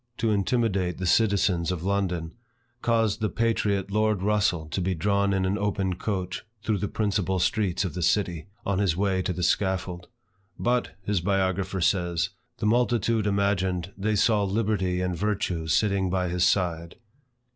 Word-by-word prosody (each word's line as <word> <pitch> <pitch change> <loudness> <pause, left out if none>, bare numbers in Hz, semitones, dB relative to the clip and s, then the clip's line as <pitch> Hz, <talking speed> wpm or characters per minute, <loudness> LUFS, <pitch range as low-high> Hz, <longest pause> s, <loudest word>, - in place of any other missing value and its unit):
to 115 - +1
intimidate 100 -3 0
the 95 - -3
citizens 95 -3 +2
of 90 -2 -4
London, 90 -4 -1 0.5
caused 115 -3 +1
the 110 - +1
patriot 105 -4 0
Lord 105 -2 +1
Russel 100 -6 +1
to 95 - -2
be 90 +1 0
drawn 100 +3 +1
in 95 -1 +1
an 100 +3 0
open 100 -2 0
coach, 95 -1 -3 0.2
through 105 -3 0
the 105 - -1
principal 100 -3 0
streets 95 0 +1
of 90 - -3
the 90 - -4
city, 85 -2 0 0.2
on 100 -1 0
his 90 -5 +1
way 95 -1 +1
to 90 - -2
the 90 0 -3
scaffold. 90 -1 0 0.5
"But," 125 0 0
his 100 -2 0
biographer 95 0 0
says, 85 -2 +1 0.3
"the - - -3
multitude 115 -1 +2
imagined 95 -3 0
they 105 +2 0
saw 105 +1 +3
liberty 100 -3 0
and 90 -1 -1
virtue 95 -4 -1
sitting 95 +3 +2
by 90 -1 0
his 90 0 0
side." 85 -3 0
95 Hz, 160 wpm, -26 LUFS, 90-105 Hz, 0.5 s, saw